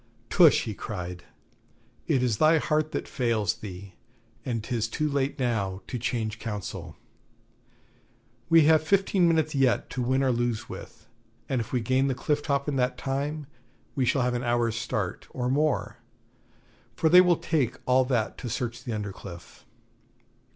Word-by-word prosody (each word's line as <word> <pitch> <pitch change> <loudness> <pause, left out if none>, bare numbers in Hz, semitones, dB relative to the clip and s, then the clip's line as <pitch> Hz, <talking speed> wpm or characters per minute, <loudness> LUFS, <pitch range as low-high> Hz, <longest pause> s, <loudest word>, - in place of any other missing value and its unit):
'Tush!' 165 -6 +6
he 110 - -4
cried; 90 -4 -6 0.8
'it 130 - +2
is 115 -4 +1
thy 155 +1 +5
heart 155 0 0
that - - -3
fails 115 -6 0
thee, 95 -2 -9 0.5
and 115 -4 -3
'tis 115 -1 -1
too 150 +7 -1
late 140 -1 -1
now 100 -7 -1
to 125 - -5
change 115 -2 -2
counsel. 105 -4 -6 1.5
We 165 -1 +7
have 155 +1 +5
fifteen 190 +1 +2
minutes 160 -2 +2
yet 135 -3 +1
to 125 - -3
win 130 +2 +1
or 130 - +3
lose 120 -2 -1
with, - - -10 0.4
and 130 -3 0
if 110 - -8
we 125 - 0
gain 130 +4 +2
the 135 - 0
cliff 145 +3 0
top 140 -1 -1
in 145 -2 -1
that 125 0 0
time 145 +3 -3 0.5
we 130 - 0
shall 130 +1 +2
have 125 0 0
an 120 +1 -2
hour's 120 -2 +1
start, 110 -5 -3
or 125 -1 -3
more, 150 +1 0 1.0
for - - +1
they 180 +3 +8
will 180 -2 +3
take 130 -7 0
all 130 +1 +4
that 120 -4 -1
to 125 - -5
search 120 +1 -4
the 120 - -4
under 105 -2 -4
cliff. 85 -10 -12
125 Hz, 165 wpm, -27 LUFS, 115-145 Hz, 1.5 s, they